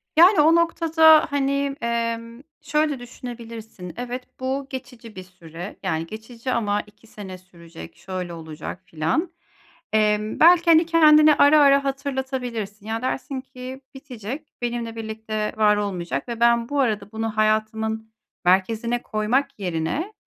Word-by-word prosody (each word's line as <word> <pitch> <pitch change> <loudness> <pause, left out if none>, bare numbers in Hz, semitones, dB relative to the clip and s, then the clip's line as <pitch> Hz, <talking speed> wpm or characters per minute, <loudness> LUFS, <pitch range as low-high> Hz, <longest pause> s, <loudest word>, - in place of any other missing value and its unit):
Yani, 345 +1 +7
o 320 +2 +5
noktada, 325 -2 +5
hani, 280 0 0
emm, 230 0 -3 0.2
şöyle 300 -2 0
düşünebilirsin, 230 -7 -9
"Evet, 250 +1 -5 0.2
bu 265 +1 -3
geçici 245 -4 -9
bir 185 - -8
süre. 175 0 -10
Yani, 165 -3 -1
geçici 230 +4 -7
ama 210 -3 0
2 210 +2 -22
sene 190 -4 -9
sürecek, 170 - -13
şöyle 185 -2 -6
olacak 160 +2 -8
filan." 165 - -1 0.6
Emm, 215 0 +1
belki, 340 +1 +7
hani, 325 +1 +6
kendine 305 -2 +6
ara 295 +1 +6
ara 280 0 +5
hatırlatabilirsin. 260 -6 -4
Ya, 225 +1 -3
dersin 265 +1 -3
ki: 260 0 -9
"Bitecek, 255 +1 -7 0.2
benimle 235 -1 -3
birlikte 220 -1 -4
var 210 -1 +4
olmayacak 180 - -3
ve 235 -1 -5
ben 235 0 +3
bu 285 -1 0
arada 215 -5 -1
bunu 220 0 -3
hayatımın 220 +1 0 0.3
merkezine 225 +6 +1
koymak 215 +5 -1
yerine, 180 - -2
230 Hz, 135 wpm, -23 LUFS, 210-275 Hz, 0.6 s, Yani